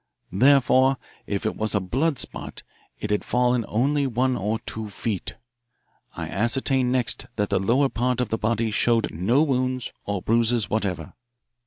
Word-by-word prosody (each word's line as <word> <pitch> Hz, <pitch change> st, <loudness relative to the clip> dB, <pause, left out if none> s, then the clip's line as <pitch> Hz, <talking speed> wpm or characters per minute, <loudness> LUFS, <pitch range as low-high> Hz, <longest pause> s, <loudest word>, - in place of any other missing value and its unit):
Therefore, 130 Hz, +4 st, +4 dB, 0.3 s
if 100 Hz, -1 st, -3 dB
it -, -, -1 dB
was 110 Hz, 0 st, -1 dB
a -, -, +3 dB
blood 135 Hz, -, 0 dB
spot, -, -, -3 dB, 0.4 s
it 105 Hz, -, -4 dB
had 105 Hz, -, +1 dB
fallen 125 Hz, -1 st, +1 dB
only 140 Hz, +5 st, +1 dB
one 130 Hz, +1 st, +1 dB
or 105 Hz, +2 st, -1 dB
two 110 Hz, -1 st, -5 dB
feet. 100 Hz, -1 st, -4 dB, 0.8 s
I -, -, -4 dB
ascertained 125 Hz, +4 st, +1 dB
next 125 Hz, -3 st, 0 dB
that 105 Hz, -1 st, -1 dB
the 100 Hz, -, +2 dB
lower 125 Hz, +9 st, +2 dB
part 125 Hz, 0 st, -1 dB
of 125 Hz, -3 st, 0 dB
the 110 Hz, -, -1 dB
body 115 Hz, +1 st, 0 dB
showed 115 Hz, +1 st, +1 dB
no 110 Hz, -, +2 dB
wounds 130 Hz, -3 st, -1 dB
or 100 Hz, -3 st, -3 dB
bruises 115 Hz, 0 st, +1 dB
whatever. 100 Hz, -4 st, -2 dB
115 Hz, 160 wpm, -24 LUFS, 105-130 Hz, 0.8 s, Therefore